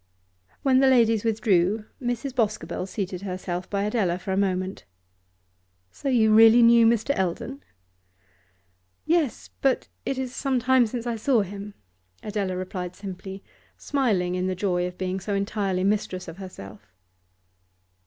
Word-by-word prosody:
When 260 Hz, -2 st, +4 dB
the 270 Hz, -, +5 dB
ladies 230 Hz, -4 st, +4 dB
withdrew 215 Hz, -2 st, +1 dB, 0.2 s
Mrs. 245 Hz, +2 st, -3 dB
Boscobel 210 Hz, -7 st, -1 dB
seated 185 Hz, -2 st, -4 dB
herself 185 Hz, -2 st, -4 dB
by 200 Hz, -1 st, -1 dB
Adela 205 Hz, -5 st, 0 dB
for 190 Hz, +1 st, -6 dB
a -, -, +1 dB
moment. 190 Hz, -1 st, -1 dB, 1.1 s
'So 275 Hz, -, -4 dB
you 220 Hz, -4 st, +4 dB
really 225 Hz, +2 st, +8 dB
knew 230 Hz, 0 st, +7 dB
Mr. 235 Hz, +4 st, +2 dB
Eldon?' 190 Hz, +9 st, -3 dB, 1.4 s
'Yes, 320 Hz, -6 st, 0 dB
but 270 Hz, -2 st, +1 dB
it 270 Hz, -, -2 dB
is 255 Hz, -1 st, -4 dB
some 270 Hz, -2 st, 0 dB
time 250 Hz, 0 st, +4 dB
since 235 Hz, +1 st, -5 dB
I 235 Hz, -1 st, -2 dB
saw 230 Hz, +1 st, +2 dB
him,' 200 Hz, +1 st, -7 dB, 0.5 s
Adela 200 Hz, -3 st, -2 dB
replied 180 Hz, -1 st, -5 dB
simply, 195 Hz, 0 st, -8 dB, 0.3 s
smiling 210 Hz, -11 st, 0 dB
in 185 Hz, 0 st, -1 dB
the 185 Hz, -, -1 dB
joy 180 Hz, -2 st, 0 dB
of 180 Hz, 0 st, -9 dB
being 185 Hz, 0 st, -2 dB
so 200 Hz, +2 st, -3 dB
entirely 195 Hz, -2 st, -1 dB
mistress 195 Hz, -2 st, -1 dB
of 165 Hz, +1 st, -9 dB
herself. 140 Hz, -, -11 dB
205 Hz, 145 wpm, -25 LUFS, 185-235 Hz, 1.4 s, really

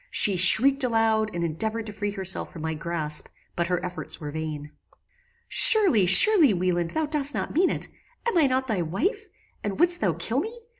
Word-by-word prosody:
She 200 Hz, -3 st, 0 dB
shrieked 260 Hz, +10 st, +3 dB
aloud, 225 Hz, -2 st, -1 dB
and 170 Hz, -3 st, -6 dB
endeavoured 220 Hz, +8 st, -3 dB
to 210 Hz, -, -10 dB
free 205 Hz, 0 st, -5 dB
herself 190 Hz, -2 st, -4 dB
from 160 Hz, -, -11 dB
my 160 Hz, 0 st, -4 dB
grasp; 155 Hz, -1 st, -6 dB, 0.3 s
but 170 Hz, 0 st, -3 dB
her 180 Hz, 0 st, -4 dB
efforts 180 Hz, 0 st, -8 dB
were 150 Hz, -3 st, -8 dB
vain. 150 Hz, -1 st, -8 dB, 0.8 s
"Surely, 365 Hz, -, +7 dB
surely 295 Hz, -, +7 dB
Wieland, 175 Hz, -1 st, -3 dB
thou 315 Hz, -, -4 dB
dost 295 Hz, -2 st, -1 dB
not -, -, -6 dB
mean 360 Hz, +4 st, 0 dB
it. -, -, -5 dB, 0.4 s
Am 470 Hz, -, -2 dB
I 320 Hz, -5 st, +2 dB
not 260 Hz, 0 st, -3 dB
thy 215 Hz, -8 st, -4 dB
wife? 380 Hz, -, -4 dB, 0.4 s
and 205 Hz, +3 st, -6 dB
wouldst 350 Hz, +1 st, +2 dB
thou 190 Hz, -6 st, -1 dB
kill 195 Hz, -, -4 dB
me? 450 Hz, +8 st, -8 dB
210 Hz, 190 wpm, -23 LUFS, 170-280 Hz, 0.8 s, Surely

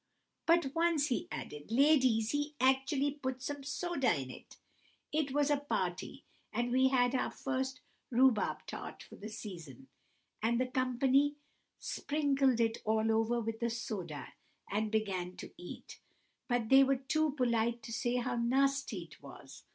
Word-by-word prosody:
"But 335 Hz, -5 st, +3 dB
once," 330 Hz, -3 st, +2 dB
he 245 Hz, -, -1 dB
added, 150 Hz, +7 st, -7 dB
"ladies, 255 Hz, -4 st, +4 dB
he 290 Hz, +1 st, -2 dB
actually 270 Hz, +2 st, +2 dB
put 260 Hz, -3 st, -4 dB
some 285 Hz, 0 st, -4 dB
soda 285 Hz, -1 st, 0 dB
in. 130 Hz, -1 st, -8 dB, 0.7 s
It 300 Hz, -2 st, 0 dB
was 290 Hz, +1 st, +2 dB
at 290 Hz, -, +4 dB
a 285 Hz, -, -18 dB
party, -, -, -2 dB, 0.3 s
and 240 Hz, 0 st, -1 dB
we 260 Hz, +1 st, +4 dB
had 250 Hz, -1 st, +3 dB
our 255 Hz, -, +1 dB
first 265 Hz, -1 st, -3 dB, 0.3 s
rhubarb 250 Hz, -3 st, +3 dB
tart -, -, -7 dB
for -, -, -13 dB
the 215 Hz, -, -7 dB
season, 170 Hz, -, -9 dB, 0.5 s
and 235 Hz, +2 st, +2 dB
the 255 Hz, -, +2 dB
company 255 Hz, +3 st, +2 dB, 0.4 s
sprinkled 275 Hz, -4 st, +1 dB
it 225 Hz, -1 st, +1 dB
all 220 Hz, +1 st, +2 dB
over 225 Hz, +2 st, +2 dB
with 225 Hz, 0 st, -4 dB
the 235 Hz, -1 st, 0 dB
soda 195 Hz, -, -5 dB, 0.4 s
and 215 Hz, +1 st, 0 dB
began 190 Hz, -5 st, -1 dB
to -, -, -8 dB
eat, 175 Hz, -, -10 dB, 0.5 s
but 245 Hz, -3 st, 0 dB
they 270 Hz, 0 st, +8 dB
were 270 Hz, 0 st, +3 dB
too 295 Hz, +3 st, 0 dB
polite 235 Hz, -3 st, +1 dB
to 230 Hz, -, -6 dB
say 240 Hz, +2 st, 0 dB
how 250 Hz, 0 st, -1 dB
nasty 270 Hz, +3 st, +1 dB
it -, -, -16 dB
was. -, -, -12 dB
255 Hz, 155 wpm, -33 LUFS, 225-275 Hz, 0.7 s, they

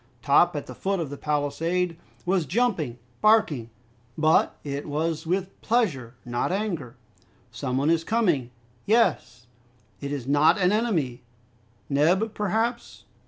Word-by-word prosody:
Top, 160 Hz, +4 st, +4 dB
at 145 Hz, -, -3 dB
the -, -, -9 dB
foot 195 Hz, 0 st, -2 dB
of 155 Hz, -5 st, -3 dB
the -, -, -4 dB
palisade, 165 Hz, +5 st, -1 dB, 0.3 s
was 180 Hz, -3 st, +1 dB
jumping, 180 Hz, -, 0 dB, 0.2 s
barking, 210 Hz, -, +3 dB, 0.5 s
but 155 Hz, 0 st, +3 dB
it 140 Hz, 0 st, -4 dB
was 155 Hz, +2 st, -2 dB
with 190 Hz, +2 st, -2 dB
pleasure, 155 Hz, -, 0 dB
not 120 Hz, +6 st, -1 dB
anger. 175 Hz, -, -3 dB, 0.6 s
"Some 125 Hz, 0 st, -3 dB
one 145 Hz, +4 st, +2 dB
is 165 Hz, -1 st, +2 dB
coming." 175 Hz, -, +1 dB, 0.4 s
"Yes." 185 Hz, -, +1 dB, 0.5 s
"It 140 Hz, -, -5 dB
is 140 Hz, -4 st, -4 dB
not 145 Hz, +3 st, +4 dB
an 180 Hz, 0 st, +3 dB
enemy!" 170 Hz, -, 0 dB, 0.7 s
"Neb, 180 Hz, +10 st, +2 dB
perhaps?" 225 Hz, +4 st, -2 dB
165 Hz, 130 wpm, -25 LUFS, 140-195 Hz, 0.7 s, Top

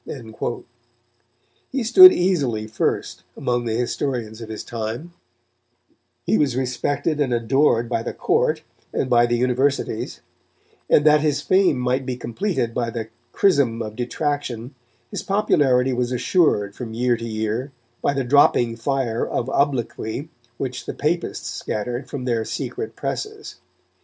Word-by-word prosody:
He 265 Hz, -2 st, -1 dB
stood 370 Hz, +12 st, +10 dB
easily 140 Hz, -, 0 dB
first 110 Hz, +1 st, -2 dB, 0.2 s
among 120 Hz, -1 st, -1 dB
the 110 Hz, -1 st, -1 dB
historians 120 Hz, -2 st, -2 dB
of 110 Hz, -, -8 dB
his 110 Hz, -, -6 dB
time; 115 Hz, +9 st, -5 dB, 1.1 s
he 110 Hz, -, +2 dB
was 140 Hz, -5 st, +1 dB
respected 140 Hz, +4 st, -1 dB
and 135 Hz, -3 st, +1 dB
adored 120 Hz, 0 st, +2 dB
by 115 Hz, -1 st, -1 dB
the -, -, -4 dB
Court -, -, +1 dB, 0.3 s
and 130 Hz, -, -2 dB
by 120 Hz, 0 st, +5 dB
the 120 Hz, 0 st, +1 dB
Universities, 130 Hz, +3 st, 0 dB, 0.7 s
and 150 Hz, -, +5 dB
that 150 Hz, -1 st, +6 dB
his 145 Hz, -2 st, +1 dB
fame 190 Hz, -4 st, +3 dB
might 125 Hz, +1 st, 0 dB
be 125 Hz, -1 st, -2 dB
completed 125 Hz, -, -2 dB
by 120 Hz, -1 st, -1 dB
the 115 Hz, -1 st, -5 dB, 0.2 s
chrism 140 Hz, -, +2 dB
of 110 Hz, -1 st, -7 dB
detraction, 125 Hz, -1 st, -3 dB, 0.4 s
his -, -, -3 dB
popularity 135 Hz, -10 st, +2 dB
was 125 Hz, 0 st, -1 dB
assured 125 Hz, -, +2 dB
from 110 Hz, 0 st, -7 dB
year 120 Hz, +1 st, +2 dB
to 115 Hz, 0 st, -6 dB
year 110 Hz, +4 st, -2 dB, 0.3 s
by 140 Hz, -, +1 dB
the 135 Hz, -, 0 dB
dropping 120 Hz, -3 st, +4 dB
fire 120 Hz, -2 st, -1 dB
of 125 Hz, +3 st, -2 dB
obloquy 135 Hz, 0 st, -1 dB, 0.3 s
which 125 Hz, -2 st, -5 dB
the -, -, -4 dB
Papists 170 Hz, +4 st, -2 dB
scattered 120 Hz, +4 st, -4 dB
from 130 Hz, -2 st, -5 dB
their 115 Hz, -3 st, 0 dB
secret 435 Hz, -, -5 dB
presses. 430 Hz, 0 st, -5 dB
125 Hz, 140 wpm, -22 LUFS, 115-145 Hz, 1.1 s, stood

